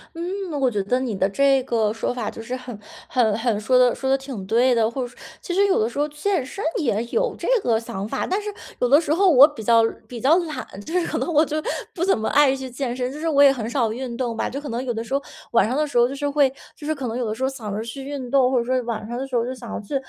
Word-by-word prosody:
嗯， 365 +1 -4
我 260 -2 +3
觉 205 -4 -1
得 250 +6 +1
你 240 -6 -2
的 190 +1 +1
这 270 +4 +3
个 220 -4 0
说 225 - -2
法 235 -4 -3
就 - - -8
是 245 +3 -6
很 250 -4 -8 0.3
很 220 -5 +2
很 230 -2 0
说 250 +4 +3
得 250 -1 +4
说 265 - -3
得 270 - +4
挺 265 -8 -7
对 240 +4 +3
的， 225 -1 +2
或 265 - -3
者 245 - -2
说 - - -18 0.2
其 355 - -5
实 400 +2 +4
有 380 - +2
的 220 - +2
时 240 - -10
候 295 - +2
健 300 0 -1
身 395 +9 -7 0.2
也 230 -8 0
有 - - 0
这 - - -4 0.2
个 225 -2 +2
想 200 -3 -5
法， - - -3
但 385 +3 0
是 415 0 -5 0.3
有 245 - +1
的 285 +3 +7
时 310 -2 0
候 380 +2 +4
我 280 -2 +9
比 270 -8 -9
较 230 +1 +5 0.3
比 245 - -7
较 280 +8 +4
懒， 320 -3 -4 0.2
就 355 +3 0
是 340 - -2
可 - - -2
能 340 - -2
我 305 +2 +5
就 300 - -4 0.4
不 350 - -3
怎 385 -7 +3
么 220 - -2
爱 285 -2 +5
去 265 -1 -5
健 250 0 -3
身， 250 0 -2
就 285 - -8
是 325 - 0
我 285 -2 +4
也 275 -1 +7
很 230 -4 -4
少 240 -3 +1
运 245 -1 -5
动 240 -3 -2
吧。 - - -1
就 275 - -5
可 290 - -8
能 240 +1 -3
有 245 -2 -2
的 225 - -3
时 230 +4 -7
候， 280 - +1 0.3
晚 235 - +4
上 250 +5 -1
的 305 0 +1
时 280 - -2
候 240 - +6
就 - - -5
是 285 +1 -2
会 280 -2 +3 0.2
就 295 - -11
是 310 - 0
可 270 -4 -5
能 230 +2 -3
有 250 - -1
的 215 - -2
时 240 - -9
候 265 - +2
想 220 -7 -6
着 215 - -2
去 235 +4 -7
运 270 -3 -5
动， 260 -1 +3
或 255 - +2
者 235 - -2
说 255 0 +1
晚 220 -2 -4
上 240 +1 -4
的 265 - -3
时 270 - -14
候 230 - +1
就 255 - -3
想 235 -3 -9
要 - - -4
去， 215 +7 -6
255 Hz, 340 characters per minute, -23 LUFS, 230-285 Hz, 0.4 s, 我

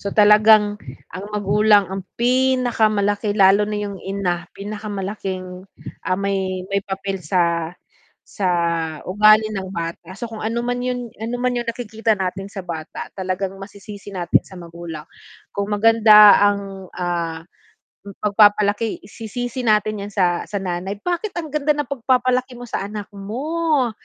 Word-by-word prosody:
so 200 - -4
talagang 210 0 +5 0.3
ang 185 +3 -6
magulang 210 0 +3
ang 195 -1 -4
pinakamalaki 225 -5 +1
lalo 200 +2 +5
na 210 - -2
yung 200 -2 -5
ina, 190 -3 -3
pinakamalaking, 195 -3 -5 0.4
ah, 185 - +1
may 190 -2 -2
may 200 - +2
papel 195 -1 -4
sa, 170 0 0 0.5
sa 195 -3 -2 0.6
ugali 215 +3 +5
ng 190 -2 -4
bata 170 +2 -5
so - - -6
kung 225 -1 -9
ano 230 +2 -1
man 245 0 -1
yun 245 -2 -3
ano 230 +2 -3
man 250 0 +1
yung 240 -1 -3
nakikita 225 -1 -2
natin 195 +1 -3
sa 195 - -6
bata, 160 -3 -6
talagang 190 0 -3
masisisi 200 +1 -10
natin 175 -3 +1
sa 185 -2 -12
magulang 170 -2 -9 0.5
kung 200 +1 -2
maganda 210 -1 +7
ang, 195 -2 -7
ah, 170 -2 -2 0.9
pagpapalaki 205 +1 +3
sisisi 240 +4 -5
natin 210 -1 +1
yan - - -14
sa 175 -3 +1
sa 205 - -4
nanay 190 +1 -3
bakit 355 +3 -2
ang 315 -4 -5
ganda 300 0 +1
ng 295 - -1
pagpapalaki 255 0 +1
mo 245 - -9
sa 240 - -4
anak 210 -1 -5
mo 270 +6 -1
205 Hz, 140 wpm, -21 LUFS, 190-225 Hz, 0.9 s, maganda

